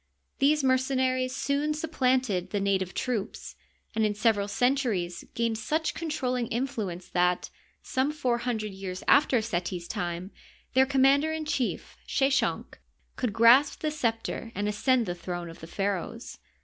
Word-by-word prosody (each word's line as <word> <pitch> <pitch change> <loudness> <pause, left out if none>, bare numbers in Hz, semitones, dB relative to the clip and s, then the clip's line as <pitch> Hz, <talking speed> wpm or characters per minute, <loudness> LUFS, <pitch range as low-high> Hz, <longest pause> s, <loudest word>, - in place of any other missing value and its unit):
These 295 +1 +3
mercenaries 260 0 +1
soon 285 +2 0
supplanted 255 - 0
the 205 - -1
native 190 -2 0
troops, 230 -5 -3 0.4
and 220 0 +1
in 210 -1 +1
several 210 -2 +2
centuries 210 -7 0
gained 230 -1 0
such 315 +8 -1
controlling 255 -7 -2
influence 220 -8 -3
that, 180 0 +1 0.3
some 265 +3 0
four 255 -6 0
hundred 225 -4 -2
years 190 -1 -6
after 285 -3 +5
Setfs 175 -4 -3
time, 175 +2 -4 0.4
their 265 +1 +5
com 270 -1 +2
mander 280 +3 +4
in 315 0 -3
chief, 260 -5 -2
Sheshonq, 270 -1 0 0.4
could 245 -4 -1
grasp 235 +6 +5
the 310 - 0
scepter 230 -4 -2
and 205 0 -1
ascend 240 +4 +2
the 175 - -2
throne 175 -1 -5
of 165 - -14
the 160 - -9
pharaohs. 200 +4 -3
235 Hz, 145 wpm, -28 LUFS, 195-270 Hz, 0.4 s, after